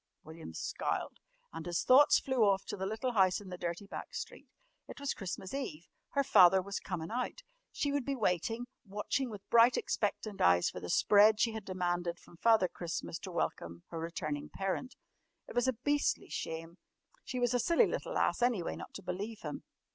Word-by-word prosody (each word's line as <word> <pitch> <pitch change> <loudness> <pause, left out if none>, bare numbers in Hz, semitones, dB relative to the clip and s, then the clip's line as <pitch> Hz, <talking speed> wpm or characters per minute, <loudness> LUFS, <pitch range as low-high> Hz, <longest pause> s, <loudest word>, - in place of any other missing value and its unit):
William 160 - -9
scowled, 80 - -3 0.3
and 165 +1 -6
his 175 -1 0
thoughts 270 +3 +7
flew 260 -4 +1
off 195 -1 +3
to - - -4
the 190 -1 -3
little 220 +5 -2
house 190 -5 +3
in 200 -2 -11
the 180 - -5
dirty 170 +3 -3
back - - -8
street. - - -7 0.4
It - - -9
was 280 -1 -1
Christmas 190 +1 -6
Eve. 170 - -4 0.3
Her 280 - +3
father 190 -8 +7
was 200 +1 -4
"comin' 170 -2 -5
out." 250 - -3 0.3
She 285 - -1
would 285 -1 0
be 275 +2 -2
waiting, 225 +2 0 0.2
watching 210 +6 -2
with 205 -3 -9
bright, 235 +1 +6
expectant 210 -1 -2
eyes 90 0 +4
for - - -7
the 90 - -7
"spread" 210 - +5
she 230 - +3
had 220 -1 -6
demanded 175 -2 -1
from 170 - -18
Father 220 -2 +4
Christmas 170 -1 -5
to 190 - -7
welcome 85 - -3
her 165 - -5
returning 155 -3 -4
parent. 195 +7 -3 0.5
It - - -9
was 245 +1 +2
a 260 - +3
beastly 290 +5 0
shame. 165 +2 -5 0.4
She 255 - -5
was 245 0 +2
a 245 - +2
silly 335 +7 +4
little - - -3
ass, - - +1
anyway, 235 -8 +1
not - - -10
to 200 - -7
believe 205 +5 -5
him. - - -5
200 Hz, 195 wpm, -33 LUFS, 175-245 Hz, 0.5 s, thoughts